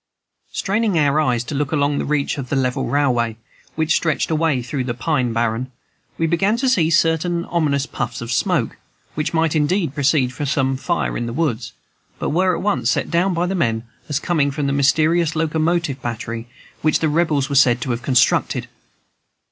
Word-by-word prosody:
Straining 205 -1 0
our 145 -1 +3
eyes 125 -5 +1
to 135 - -6
look 145 0 -1
along 145 -2 +1
the - - -2
reach 145 -1 -1
of 130 -2 -6
level 135 -1 0
railway 120 -4 +1 0.4
which 160 0 +1
stretched 155 0 0
away 155 -5 +1
through 130 +2 -3
the 120 -2 -3
pine 130 -2 0
barren, 115 +2 -1 0.5
we 165 - +1
began 195 +7 +1
to 265 +2 0
see 175 -11 +3
certain 170 +1 +1
ominous 145 -5 0
puffs 120 -4 -4
of 115 +1 -5
smoke, 140 - 0 0.4
which 150 - -2
might 160 -1 +1
indeed 155 0 +1
proceed 140 -3 +1
from 145 +2 -4
some 135 -1 +1
fire 170 +6 -1
in 120 - -2
the 115 - -4
woods, 115 -8 -1 0.4
but - - -2
were 180 +3 +2
at - - -5
once 130 - +1
set - - 0
down 180 +2 +2
by 170 +2 +1
the 185 - -2
men 115 -11 0 0.3
as 145 - 0
coming 155 -3 +1
from 145 +1 -3
the 140 - 0
mysterious 155 +4 +2
locomotive 160 -2 0
battery 115 0 -5 0.3
which 155 -1 +3
the 160 - 0
Rebels 150 -3 +1
were 145 - -4
said 130 -3 +5
to 130 - -2
have 120 +1 -2
constructed. 130 -1 +2
145 Hz, 190 wpm, -20 LUFS, 130-165 Hz, 0.5 s, said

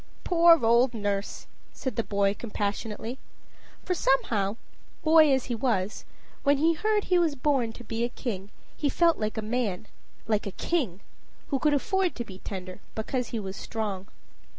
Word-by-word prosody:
"Poor 335 -6 +6
old 235 +2 +4
nurse!" 205 -2 -2 0.3
said 260 -5 -4
the - - +1
boy 200 -1 +1
compassionately. 215 +3 -4 0.7
For 365 - +1
somehow, 225 - +1 0.5
boy 315 -2 +6
as 265 -2 +2
he 245 - -3
was, 220 -5 -1 0.4
when 285 0 +3
he 325 +4 +3
heard 425 +5 +1
he 360 -1 +3
was 325 -4 +2
born 265 -4 +1
to 240 - -11
be 225 +1 -2
a 240 - 0
king, 200 -6 -5 0.3
he 290 - 0
felt 335 +4 +3
like 215 0 -2
a 220 - -2
man 215 -4 -1 0.4
like 215 -2 0
a - - -3
king 230 - -1 0.5
who 275 - 0
could 295 +1 +3
afford 380 +5 +1
to 240 - -4
be 190 -3 -10
tender 185 -2 -7 0.2
because 245 +3 -2
he 230 - -3
was 195 -2 -5
strong. 205 -4 -4
235 Hz, 170 wpm, -27 LUFS, 205-290 Hz, 0.7 s, Poor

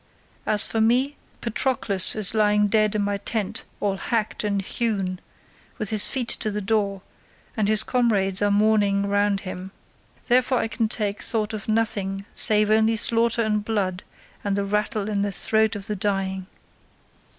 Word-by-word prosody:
As 210 -1 +3
for 225 - -1
me, 255 +6 +2 0.3
Patroclus 225 -5 +3
is 215 -2 +2
lying 210 -1 +2
dead 215 0 +2
in 210 - 0
my 200 0 -1
tent, 205 0 -3
all 200 -2 -1
hacked 220 +2 -2
and 200 -1 0
hewn, 195 -3 -2 0.6
with 215 - -2
his 215 -2 +3
feet 255 -3 -2
to 215 - 0
the 210 0 -3
door, 200 -2 -1 0.5
and 215 -2 0
his 215 0 +3
comrades 205 -7 0
are 205 - +2
mourning 205 -1 +2
round 205 0 +1
him. 185 -1 -7 0.6
Therefore 255 +1 +3
I 225 - -1
can 225 -1 -1
take 210 -3 -2
thought 220 -2 0
of 215 -1 -6
nothing 200 -3 -1
save 210 -1 +4
only 220 +1 +3
slaughter 230 +1 +2
and 210 -1 0
blood 200 -4 -2 0.4
and 200 -2 -1
the 200 0 -1
rattle 210 +1 -1
in 205 -2 -1
the 205 0 -1
throat 220 +2 +1
of 200 -1 -7
the 210 - -3
dying." 190 -1 -2
210 Hz, 165 wpm, -23 LUFS, 200-220 Hz, 0.6 s, save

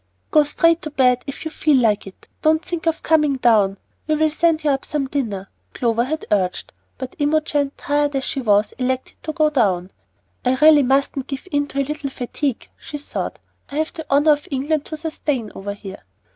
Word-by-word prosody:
"Go 305 - +6
straight 330 +3 +3
to 305 - -5
bed 250 -3 +3
if 275 +3 -6
you 315 - -3
feel 305 -2 +3
like 215 -5 +2
it. 190 - -14
Don't 315 +2 +2
think 340 -2 -4
of 330 - 0
coming 300 -4 +3
down. 210 -6 +3 0.3
We 310 - +2
will 310 0 +2
send 320 0 +2
you 295 - +3
up 270 0 -1
some 295 -2 -2
dinner," 225 -9 -3 0.3
Clover 235 -1 +1
had 315 +4 -3
urged; 185 -3 0 0.2
but 260 +3 -7
Imogen, 290 -1 +1
tired 290 0 0
as 270 - 0
she 270 - -2
was, 210 -2 +3
elected 260 0 -2
to 315 - -4
go 310 -1 +2
down. 195 -9 +1 0.5
"I 255 +1 +2
really 300 +2 +7
mustn't 270 0 +1
give 275 +6 -6
in 290 0 +1
to 275 -1 -2
a - - -1
little 295 0 -4
fatigue," 260 0 -3
she 295 - -7
thought. 290 - -5 0.3
"I - - -6
have 315 +1 -1
the 320 -4 -8
honor 290 +3 +5
of 295 0 0
England 290 +2 -1
to 310 - -6
sustain 295 -7 -3
over 200 +1 -5
here." 195 - -10
280 Hz, 200 wpm, -21 LUFS, 250-305 Hz, 0.5 s, really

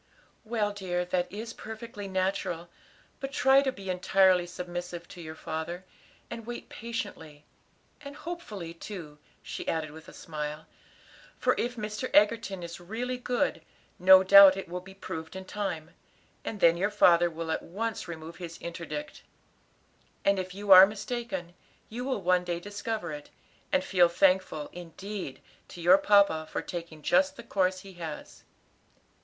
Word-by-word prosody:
"Well, 215 -2 -1
dear, 180 -3 -2
that 180 0 -1
is 225 +3 -6
perfectly 220 -2 -8
natural, 185 -2 -2 0.5
but 270 0 -5
try 270 +1 +5
to 270 -1 0
be 200 -6 -11
entirely 185 0 +3
submissive 175 -1 -6
to 175 - -10
your 160 -1 -8
father, 160 +4 -5 0.4
and 235 -1 -7
wait 240 0 -7
patiently; 160 - -6 0.6
and 280 0 -8
hopefully 220 - -7
too," 165 -4 -9 0.2
she - - -6
added 155 -2 -1
with 160 +1 -12
a - - -12
smile; 150 -1 -6 0.7
"for - - +2
if 245 +1 -2
Mr. 215 +2 -4
Egerton 205 -3 +3
is 170 0 -7
really 240 +8 -4
good, 250 0 0 0.4
no 190 +1 +8
doubt 195 0 +9
it 195 - -5
will 180 +2 -4
be 190 +1 -13
proved 160 -3 -7
in 190 0 -7
time, 185 -6 -4 0.5
and 210 -3 -5
then 170 0 +6
your 200 +4 +1
father 175 -4 +5
will 165 0 -5
at - - -1
once 215 +1 -4
remove 165 0 -8
his 170 -2 -7
interdict. 170 - -6 1.0
And 200 -1 +4
if 185 0 -5
you 200 0 -2
are 190 +1 +12
mistaken, 210 -4 -5 0.4
you 245 +3 -5
will 260 -7 -2
one 180 0 +3
day 175 -1 -2
discover 205 -1 -4
it, 150 -1 -8 0.4
and 280 -1 +2
feel 180 -9 +4
thankful, 185 -4 +2
indeed, 180 -1 -7 0.3
to - - -11
your 180 +3 +6
papa 200 -7 +4
for - - -2
taking 165 -3 -7
just 285 - +3
the 235 - -10
course 185 -4 0
he 195 0 -12
has." 155 -2 -7
185 Hz, 155 wpm, -29 LUFS, 170-210 Hz, 1.0 s, are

